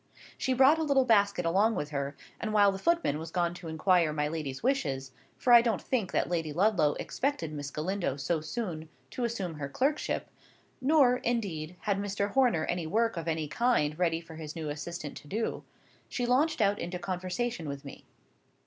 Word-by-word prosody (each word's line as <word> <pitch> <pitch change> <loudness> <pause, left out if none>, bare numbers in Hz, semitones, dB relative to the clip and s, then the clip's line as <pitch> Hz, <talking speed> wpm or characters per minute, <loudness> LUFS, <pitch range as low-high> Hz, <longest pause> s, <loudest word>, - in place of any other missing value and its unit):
She 260 - 0
brought 270 +5 +6
a - - +1
little 275 -3 +3
basket 200 -6 +3
along 200 +7 +3
with 150 +1 -3
her 140 0 -3 0.2
and 215 - -3
while 205 -2 +5
the 195 - -5
footman 335 - +1
was 160 +1 -6
gone 175 0 0
to 175 -1 -9
inquire 165 0 +2
my 150 -1 0
lady's 150 -2 -4
wishes 140 - 0 0.3
(for 245 - +3
I 235 - +10
don't 230 -4 0
think 225 -8 -1
that - - +1
Lady 165 -3 -1
Ludlow 170 -3 +3
expected 255 - -2
Miss 145 -1 -5
Galindo 165 -1 -2
so 155 +4 -1
soon 160 -4 -4 0.2
to 245 - -2
assume 200 -7 -3
her 140 -1 -4
clerkship; 280 - -1 0.5
nor, 265 -3 +5
indeed, 180 -10 -2
had 200 -2 0
Mr. 200 0 -2
Horner 240 -12 +3
any 175 -2 -2
work 225 +5 +1
of 165 -1 -5
any 160 -2 -1
kind 155 -5 +1
ready 165 -2 +2
for 165 -1 -12
his 155 -1 -7
new 160 -2 -4
assistant 150 0 -5
to 145 - -12
do), 220 +9 -2 0.5
she 245 - -2
launched 265 +3 +2
out 200 0 +2
into 175 +1 -4
conversation 185 0 -3
with 140 0 -6
me. 140 - -10
180 Hz, 190 wpm, -30 LUFS, 155-235 Hz, 0.5 s, I